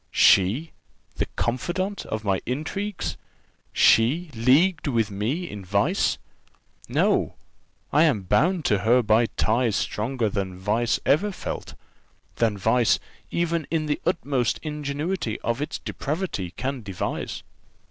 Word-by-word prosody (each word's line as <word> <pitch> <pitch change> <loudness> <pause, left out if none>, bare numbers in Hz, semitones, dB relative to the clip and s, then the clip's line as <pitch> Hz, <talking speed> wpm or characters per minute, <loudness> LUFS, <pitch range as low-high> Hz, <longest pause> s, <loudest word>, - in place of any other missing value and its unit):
She, 110 - +4 0.5
the - - 0
confidante 180 - -2
of 110 0 -3
my 95 -3 0
intrigues! 170 - -3 0.5
she 150 +9 +4
leagued 150 +10 +3
with 115 -6 +1
me 120 - -2
in 105 -8 -7
vice! 100 - +1 0.7
No, - - +2 0.6
I 155 +3 +6
am 120 -11 +1
bound 165 - +2
to 105 - +3
her 120 +5 +4
by 110 +2 +4
ties 115 -1 +2
stronger 115 +3 -1
than 95 -3 -3
vice 110 +5 0
ever 180 +9 +3
felt; - - -6 0.6
than 110 -3 +1
vice, 115 +4 +3 0.3
even 170 -2 -1
in 160 -2 0
the 150 -1 -1
utmost 140 -8 0
ingenuity 150 - -3
of 120 +4 -1
its 150 - -3
depravity, 150 - -3
can 135 0 -3
devise." 95 -4 -4
125 Hz, 125 wpm, -25 LUFS, 110-160 Hz, 0.7 s, I